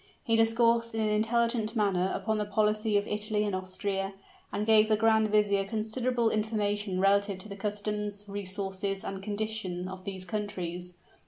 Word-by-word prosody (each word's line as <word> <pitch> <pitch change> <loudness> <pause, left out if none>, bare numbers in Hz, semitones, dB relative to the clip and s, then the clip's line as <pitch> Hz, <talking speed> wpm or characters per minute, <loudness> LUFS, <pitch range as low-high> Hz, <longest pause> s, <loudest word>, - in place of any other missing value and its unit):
He 230 -4 +2
discoursed 230 0 +3
in 225 - 0
an 215 - +1
intelligent 225 +1 +1
manner 190 -4 +1
upon 220 -1 -1
the 210 - 0
policy 215 +1 +1
of 205 - -1
Italy 210 0 0
and 205 -2 -1
Austria, 195 +1 -3 0.4
and 210 - -1
gave 220 0 +5
the 215 - +4
grand 220 0 +3
vizier 205 -2 +3
considerable 225 +3 0
information 210 -3 -1
relative 200 0 +3
to 185 +3 -10
the 200 - -6
customs, 205 0 -3
resources, 195 0 -2
and 195 -1 -5
condition 205 -3 -3
of 185 0 -8
these 190 -1 -5
countries. 180 -4 -4
210 Hz, 160 wpm, -29 LUFS, 195-220 Hz, 0.4 s, gave